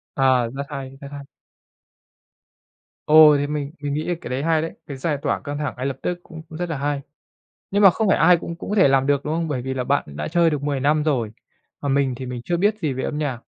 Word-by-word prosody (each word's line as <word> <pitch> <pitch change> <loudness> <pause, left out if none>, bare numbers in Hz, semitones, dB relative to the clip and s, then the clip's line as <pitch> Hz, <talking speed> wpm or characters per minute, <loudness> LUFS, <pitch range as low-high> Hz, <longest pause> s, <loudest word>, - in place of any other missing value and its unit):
À, 130 -3 +3
rất 140 - -3
hay, 135 -2 -6
rất 140 - -8
hay. 140 -1 -7 1.8
Ồ, 155 -1 +8
thì 145 0 0
mình 145 -1 -3
mình 145 -1 -3
nghĩ 155 +2 -2
là 175 - +1
cái - - -8
đấy 130 +2 -2
hay 160 0 +2
đấy, 165 - -4
cái 140 - -6
giải 145 +2 -1
tỏa - - 0
căng 145 0 -5
thẳng 150 -1 -3
ngay 130 +2 -3
lập 135 - -2
tức 180 - -2
cũng 160 -2 -11
cũng 155 - -9
rất 175 -1 -3
là 160 - -2
hay. 145 0 -1 0.7
Nhưng 205 +1 +2
mà 195 - +10
không 220 +4 0
phải - - +4
ai 175 +1 +6
cũng 170 0 -6
cũng 170 - -8
có 210 - 0
thể 190 -8 +6
làm 135 0 +2
được, 140 -1 +1
đúng 150 - -1
không? 165 0 -1
Bởi 140 -5 -2
vì 130 +1 -3
là 130 -1 -2
bạn 140 +2 +1
cũng 70 - -12
đã 75 - -3
chơi 170 0 +3
được 150 -3 -3
10 145 -2 -1
năm 150 +3 +2
rồi, 125 -8 0 0.5
còn 140 -2 -1
mình 135 -2 +1
thì 130 - -7
mình 125 -1 -5
chưa 175 - 0
biết 205 +4 +2
gì 150 -7 -1
về 130 - -4
âm 150 - -3
nhạc. 140 -6 -2
145 Hz, 275 wpm, -22 LUFS, 135-160 Hz, 1.8 s, mà